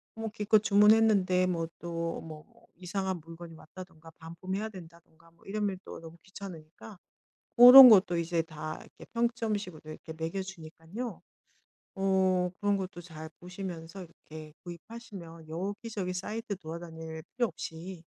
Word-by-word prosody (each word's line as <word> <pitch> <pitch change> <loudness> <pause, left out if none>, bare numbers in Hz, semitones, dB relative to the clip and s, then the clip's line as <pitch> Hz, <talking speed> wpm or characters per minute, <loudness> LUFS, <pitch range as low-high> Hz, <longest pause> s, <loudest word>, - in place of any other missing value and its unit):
뭐 225 0 -4
기껏 210 0 +2
주문했는데 205 -3 +4
뭐 165 -2 -1
또 170 -1 -4
뭐 155 -2 -10
뭐 - - -26
이상한 190 +1 -3
물건이 165 +1 -11
왔다든가 165 -1 -13
반품해야 185 +6 -5
된다든가 170 -3 -15
뭐 170 - -26
이러면 205 -1 -2
또 - - -9
너무 165 0 -12
귀찮으니까 190 0 -11 0.6
고런 250 +2 +12
것도 190 -5 +5
이제 170 0 0
다 155 -1 -7
이렇게 - - -15
평점 235 -2 0
식으로 180 -6 -9
이렇게 160 +1 -9
매겨 165 +4 -4
주니깐요 185 +5 -8 0.8
어 190 -2 +2
그런 205 0 +2
것도 190 -2 -6
잘 160 -2 -10
보시면서 180 -1 -7
이렇게 155 -2 -12
구입하시면 175 -3 -10
여기저기 195 +3 -4
사이트 210 +3 -4
돌아다닐 160 -1 -8
필요 245 - +2
없이 165 +1 -8
180 Hz, 325 characters per minute, -30 LUFS, 165-205 Hz, 0.8 s, 고런